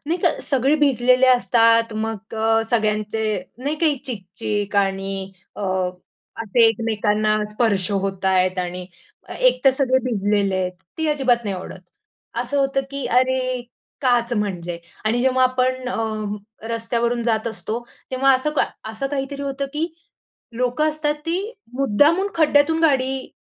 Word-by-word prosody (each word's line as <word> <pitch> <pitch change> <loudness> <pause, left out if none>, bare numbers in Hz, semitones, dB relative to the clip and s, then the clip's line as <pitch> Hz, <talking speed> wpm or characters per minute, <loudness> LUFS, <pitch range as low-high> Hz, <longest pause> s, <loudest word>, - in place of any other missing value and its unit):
नाही 340 +3 0
का - - +4
सगळे 270 +2 +2
भिजलेले 255 -3 +3
असतात, 230 -2 +4
मग 220 -1 -4
अ, 225 0 +2
सगळ्यांचे 215 -1 0 0.3
नाही 285 +4 -2
का 335 - +3 0.2
चिक-चिक 205 -1 -3
आणि 195 -1 -1 0.2
अ, - - -7 0.8
असे 225 +2 +4
एकमेकांना 215 -1 +1 0.2
स्पर्श 210 -4 +2
होतायेत 190 -1 +1
आणि 180 0 -3 0.5
एक - - +4
तर 270 - +8
सगळे 260 -1 +2
भिजलेले 205 -4 +1
आहेत 185 -1 -1 0.3
ती 320 - 0
अजिबात 260 -5 +2
नाही 200 -2 -2
आवडत. 185 0 -8 0.6
असं 250 +4 -1
होतं 275 0 +1
की 275 0 -4
"अरे, 255 0 +1 0.4
काच? 245 -3 +2
म्हणजे" 175 -5 -3 0.3
आणि 230 +3 +1
जेव्हा 260 0 +3
आपण 255 0 0
अ, 215 -1 -4
रस्त्यावरून 235 +1 -1
जात 225 -1 0
असतो, 225 0 -4 0.3
तेव्हा 265 +1 +4
असं 260 +4 0
का - - +4 0.3
असं 250 +5 -3
काहीतरी 280 0 -4
होतं 275 0 -3
की 305 +2 -1 0.7
लोकं 250 +5 +1
असतात 300 -1 -1
ती 335 - 0 0.4
मुद्दामून 290 - +3
खड्ड्यातून 315 0 +3
गाडी 265 -3 +1
235 Hz, 135 wpm, -21 LUFS, 210-270 Hz, 0.8 s, तर